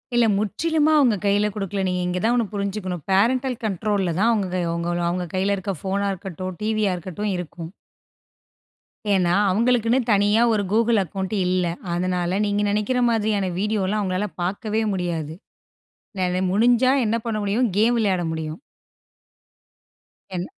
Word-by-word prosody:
இல்ல. 240 -1 +5
முற்றிலுமா 305 - +1
அவங்க 250 -6 +4
கைல 205 +1 +3
கொடுக்கல. 195 -1 -3
நீங்க 180 0 -1
இங்க 180 0 -1
தான் 230 +2 +3
ஒண்ணு 235 -2 +2
புரிஞ்சுக்கனும். 200 -4 -3
பேரெண்டல் 250 +6 +2
கண்ட்ரோல்ல 200 -2 0
தான் 230 +2 +4
அவங்க 175 -4 -1
அவங்க 180 0 -2
கைல 195 +2 +1
இருக்க 195 +1 -3
ஃபோனா 200 +1 -1
இருக்கட்டும், 185 0 -6
டிவியா 215 -2 +1
இருக்கட்டும். 185 +4 -4
இருக்கும். 170 -1 -7 1.4
ஏனா 180 -3 +2 0.2
அவர்களுக்குனு 230 +4 +2
தனியா 205 +2 +3
ஒரு 210 -2 +1
கூகிள் 230 +1 +3
அக்கவுண்ட் 190 +3 -4
இல்ல. 180 0 +1 0.3
அதனால 180 +1 -1
நீங்க 205 0 0
நெனைக்கிற 210 +5 0
மாதிரியான 210 -4 0
வீடியோல்லாம், 210 0 0
அவங்களால 190 +1 -1 0.2
பார்க்கவே 210 +4 -1
முடியாது. 165 -4 -3 0.9
நெல 180 0 0
முடிஞ்சா 240 +5 +4
என்ன 220 +2 +1
பண்ண 225 -2 -1
முடியும் 220 +4 +1
கேம் 230 +3 +3
விளையாட 195 -5 +1
முடியும். 160 +2 -5 1.7
என் 180 0 -2
200 Hz, 135 wpm, -23 LUFS, 180-220 Hz, 1.7 s, இல்ல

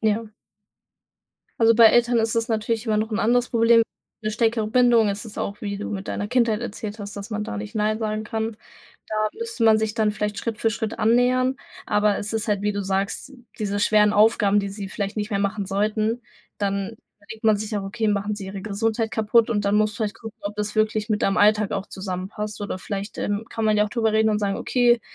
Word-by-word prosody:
Ja. 220 +1 +1 1.3
Also, 225 0 +6
bei 230 0 +8
Eltern 240 +1 +4
ist 225 0 +1
es 230 +1 0
natürlich 225 +1 -1
immer 215 -1 +1
noch 220 +1 -1
'n 215 - -1
anderes 245 +2 +2
Problem. 230 0 +5 0.4
'Ne 215 - -1
stärkere 225 0 +1
Bindung. 235 -1 +4
Es 200 +3 -3
ist 215 - -9
auch, 200 +1 -4
wie 200 -1 -3
du 210 - -4
mit 195 -1 -5
deiner 205 - -3
Kindheit 230 -2 +2
erzählt 215 -2 -6
hast, 205 0 -7
dass 200 +2 -7
man 210 0 -2
da 105 - -5
nicht 105 0 -6
Nein 215 +1 +1
sagen 215 -1 -2
kann. 220 0 -3 0.5
Da - - -4 0.2
müsste 450 - -2
man 220 -1 +6
sich 220 0 -1
dann 215 -2 +2
vielleicht 210 -1 -3
Schritt 230 -2 -3
für 225 - +1
Schritt 220 0 -4
annähern, 250 +3 +3 0.3
aber 210 -1 +2
es 210 +2 -5
ist 220 0 -2
halt, 205 -1 +1
wie 210 0 +1
du 200 0 -2
sagst, 195 +7 -2 0.3
diese 205 -1 -1
schweren 210 0 +4
Aufgaben, 205 -1 +4
die 200 - -4
sie 200 0 -6
vielleicht 200 +1 -4
nicht 210 +1 -2
mehr 200 - 0
machen 200 +1 -1
sollten, 215 +4 0 0.4
dann 200 +2 -2 0.3
denkt 220 0 -9
man 215 -1 +5
sich 215 +1 -4
auch: 200 - -2
„Okay, 220 +3 -2
machen 205 0 0
sie 195 -2 -7
ihre 195 0 -6
Gesundheit 220 +2 -1
kaputt?“ 220 +1 +3
Und 205 -3 0
dann 200 +1 +2
musst 215 0 +2
du - - -10
vielleicht 215 -1 -2
gucken, 225 0 -9
ob 205 +1 -4
das 210 0 -3
wirklich 215 0 +1
mit 210 -1 0
deinem 195 +2 +2
Alltag 210 0 +4
auch 195 0 -3
zusammenpasst. 195 +3 -5
Oder 200 -2 -4
vielleicht, 200 +2 -5
ähm, 205 +2 -2
kann 225 - -3
man 215 -1 +3
ja 210 - +4
auch - - -4
drüber 225 0 0
reden 220 0 +3
und 210 - +1
sagen: 200 -1 0
„Okay, 240 -2 +3
215 Hz, 230 wpm, -23 LUFS, 205-225 Hz, 1.3 s, bei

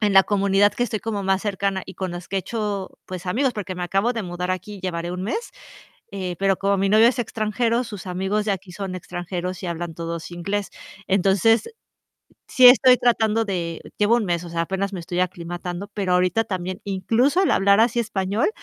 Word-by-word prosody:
en 205 -2 +2
la 195 - +9
comunidad 200 0 +3
que 240 - -2
estoy 215 -3 -3
como 215 -3 -3
más 190 0 +1
cercana 195 -2 -1
y 190 - -10
con 185 0 -4
los 175 0 -7
que 195 - -2
he - - +3
hecho, 205 -1 -3 0.2
pues, 185 -1 -7
amigos, 250 +8 +1
porque 205 -4 -5
me 180 - -5
acabo 195 +7 +1
de 225 - -2
mudar 180 0 -4
aquí, 185 +2 -5
llevaré 175 -2 -3
1 180 +1 -4
mes, 450 - -3 0.6
eh, 185 -3 -4
pero 195 0 +3
como 200 0 +1
mi 195 +1 +1
novio 215 +3 +6
es 250 +1 0
extranjero, 230 +1 0
sus 205 -5 -8
amigos 190 +4 -1
de 210 - +1
aquí 190 -1 -5
son 185 +1 -5
extranjeros 180 +1 -5
y - - -2
hablan 170 0 -4
todos 170 0 -5
inglés. 195 +4 -3 0.4
Entonces, 195 - +3 0.8
sí 255 -1 +7
estoy 255 0 +7
tratando 225 -2 +2
de 170 -5 -3 0.2
llevo 210 +3 +4
1 230 - -1
mes, 175 -1 -1
o 170 - -8
sea, 165 0 -1
apenas 190 +3 -2
me 180 - -4
estoy 175 +1 -4
aclimatando, 175 +1 -4
pero 195 -3 0
ahorita 180 +5 +2
también, 185 -3 -4
incluso 230 - +1
el 385 - +2
hablar 200 +1 +4
así 235 +1 +3
español 205 - 0
195 Hz, 205 wpm, -23 LUFS, 180-215 Hz, 0.8 s, la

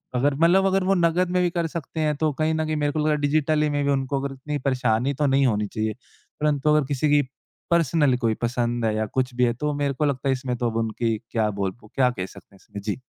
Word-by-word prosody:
अगर 135 +3 +2
मतलब 175 +5 +4
अगर 190 0 +2
वो 195 +1 +2
नकद 175 +1 +2
में 180 - +2
भी 175 - +2
कर 170 -1 -1
सकते 160 0 -6
हैं 150 -1 +1
तो 155 -1 +1
कहीं 155 +1 +2
न 160 0 0
कहीं 155 0 -1
मेरे 145 -1 0
को 155 - -2
लगा 150 - +3
डिजिटली 150 +1 +2
में 145 0 0
भी 140 - +2
उनको 135 0 0
अगर 140 -1 -4
इतनी 145 +2 -4
परेशानी 125 -1 +1
तो - - +4
नहीं 135 0 +3
होनी 105 -2 0
चाहिए। 110 0 -1 0.5
परंतु 150 -1 +1
अगर 150 -3 +2
किसी 145 +1 0
की 145 0 +5 0.5
पर्सनल 155 -4 +3
कोई 115 -3 +1
पसंद 120 -1 0
है 110 -1 +1
या 110 0 0
कुछ 130 -1 0
भी 125 - +2
है 120 - +1
तो 150 +5 -2
मेरे 145 -1 0
को 150 +3 -1
लगता 135 -1 -1
है - - +4
इसमें 130 -1 -3
तो 120 -1 0
अब 115 - -3
उनकी 110 0 -1
क्या 110 -2 +1
बोल? 100 -2 -2
उ - - -14
क्या 130 -2 +4
कह 95 -7 -4
सकते 100 - -15
हैं - - -19
इसमें। 100 - -9
जी। 105 +4 -3
140 Hz, 265 wpm, -24 LUFS, 120-155 Hz, 0.5 s, की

